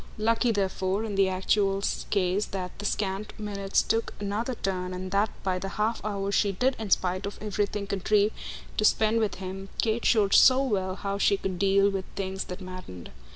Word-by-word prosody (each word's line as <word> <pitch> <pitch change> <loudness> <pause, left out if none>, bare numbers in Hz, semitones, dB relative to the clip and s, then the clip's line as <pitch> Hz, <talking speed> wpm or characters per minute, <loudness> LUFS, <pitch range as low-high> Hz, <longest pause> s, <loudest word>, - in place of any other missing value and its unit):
Lucky 230 +3 +2
therefore 195 0 -1
in 220 -2 -4
the 195 -1 +3
actual 195 +1 +1 0.3
case 190 +1 +1
that 185 -2 -4
the 205 - -5
scant 200 0 -2
minutes 200 -2 0
took 225 +1 -1
another 210 +5 -2
turn 185 -3 -3
and 185 0 -6
that 200 +2 +2
by 185 -1 0
the 195 - -4
half 220 +2 0
hour 200 -1 -2
she 200 0 +2
did 255 +7 +1
in 220 -2 -4
spite 185 +1 +1
of 200 - -7
everything 205 -1 -2
contrive 205 +2 +2 0.5
to - - +2
spend 220 +1 +3
with 215 -2 0
him 190 +1 -7
Kate 225 +1 +1
showed 205 -4 +3
so 260 +1 +7
well 190 -7 -1
how 200 0 -3
she 200 0 +3
could 190 -2 -4
deal 195 0 +4
with 190 -1 -3
things 190 0 -3
that 180 +2 -7
maddened. 185 - -9
200 Hz, 190 wpm, -27 LUFS, 190-210 Hz, 0.5 s, so